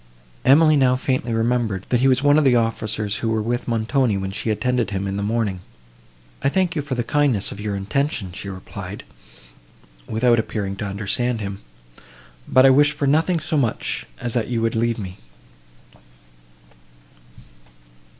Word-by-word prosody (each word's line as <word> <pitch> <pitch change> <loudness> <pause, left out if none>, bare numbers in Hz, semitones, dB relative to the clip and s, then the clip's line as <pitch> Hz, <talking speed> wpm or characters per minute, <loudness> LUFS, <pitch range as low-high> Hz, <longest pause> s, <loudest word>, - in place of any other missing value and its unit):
Emily 155 +4 +6
now 130 -2 +4
faintly 130 -2 -1
remembered, 115 -4 0
that 125 - +2
he 130 - +3
was 130 +1 +2
one 145 +1 +5
of - - +2
the 130 -3 +4
officers 110 -2 -1
who 115 - -2
were 110 0 +1
with 120 +2 -2
Montoni 115 0 +1
when 95 0 -3
she 105 - -3
attended 120 +2 0
him 100 0 -3
in 95 - -3
the 100 - -2
morning. 105 -2 -1 0.8
"I 135 - +2
thank 180 +1 0
you 150 - 0
for 140 -2 -4
the 120 - -1
kindness 135 -6 +1
of - - -8
your 105 -1 -2
intention," 105 - -2
she 100 +2 -7
replied, 95 +1 -8 1.1
without 120 +1 +3
appearing 100 -3 -3
to 105 - -4
understand 105 +4 -1
him, 100 -2 -5 0.9
"but 130 +1 +5
I 135 - +8
wish 145 +2 +4
for 140 - -2
nothing 160 +5 +2
so 155 0 -1
much 120 -6 -1
as 120 - -3
that 120 -3 0
you 120 -2 -1
would 115 - +1
leave 115 0 0
me." 95 -4 -7
115 Hz, 170 wpm, -21 LUFS, 105-135 Hz, 1.1 s, I